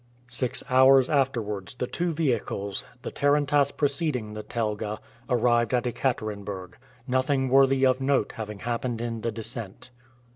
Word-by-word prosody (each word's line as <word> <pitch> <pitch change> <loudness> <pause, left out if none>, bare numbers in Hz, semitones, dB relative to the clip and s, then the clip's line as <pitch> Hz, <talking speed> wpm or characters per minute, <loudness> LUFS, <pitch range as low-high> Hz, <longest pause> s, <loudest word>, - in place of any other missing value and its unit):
Six 125 0 -2
hours 130 +1 +6
afterwards 115 -8 -1
the 125 - -2
two 175 +7 -2
vehicles, 120 - -1 0.2
the - - -4
tarantass 145 0 +2
preceding 140 -7 -1
the 105 - -5
telga, 105 -2 -3 0.3
arrived 120 0 +2
at 125 - 0
Ekaterenburg, 105 -7 -3 0.3
nothing 130 +1 +1
worthy 135 0 +5
of 130 0 +2
note 135 -5 +1
having 105 -3 -7
happened 120 0 -2
in 115 -1 -3
the 115 - -1
descent. 115 0 -8
125 Hz, 135 wpm, -26 LUFS, 110-135 Hz, 0.3 s, hours